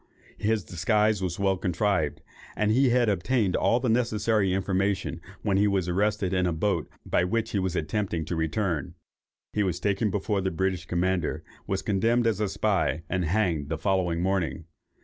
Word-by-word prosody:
His 110 0 +1
disguise 105 +4 +1
was 90 -2 -2
well 95 -1 +1
contrived, 90 -3 0 0.3
and 105 0 +1
he 130 +3 +4
had 120 -1 +3
obtained 105 0 +1
all 120 - +3
necessary 110 -4 +1
information, 95 -2 -1 0.2
when 100 -3 +2
he 105 +1 +4
was 95 -3 0
arrested 100 +1 0
in 90 -1 +2
the 90 - +1
boat 85 0 -1 0.2
by - - +2
which 110 +5 -1
he 100 - 0
was 95 -2 -1
attempting 85 0 -1
to 85 - -3
return. 80 0 -1 0.6
He 105 - +1
was 90 -4 0
taken 100 +2 +1
before 100 +1 -1
the 95 - 0
British 95 0 -2
commander, 90 -1 0 0.2
was 95 0 -1
condemned 115 +4 +2
as 110 -3 +1
a 105 -2 0
spy, 85 -9 0
and 95 -2 0
hanged 85 -5 0
the 80 - -1
following 90 -2 0
morning. 95 -4 -1
95 Hz, 170 wpm, -27 LUFS, 90-105 Hz, 0.6 s, he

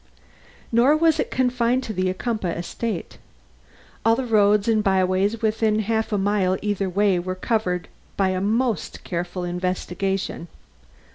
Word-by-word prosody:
Nor 250 +6 +4
was 320 -1 +3
it - - 0
confined 250 0 +1
to 220 - -5
the 185 -1 0
Ocumpaugh 190 -3 -2
estate. 220 +6 -4 0.8
All 225 0 +4
the 260 +1 -2
roads 210 -2 +3
and 220 -2 +2
byways 190 +3 +1
within 220 0 +2
half 220 +1 -1
a 205 - +1
mile 195 -2 +1
either 205 -2 -1
way 195 0 +2
were 185 +1 -4
covered 185 -4 -1 0.3
by 195 -1 +2
a 185 0 -1
most 220 -1 -1
careful 175 +1 -4
investigation. 180 +1 -2
205 Hz, 140 wpm, -23 LUFS, 185-225 Hz, 0.8 s, Nor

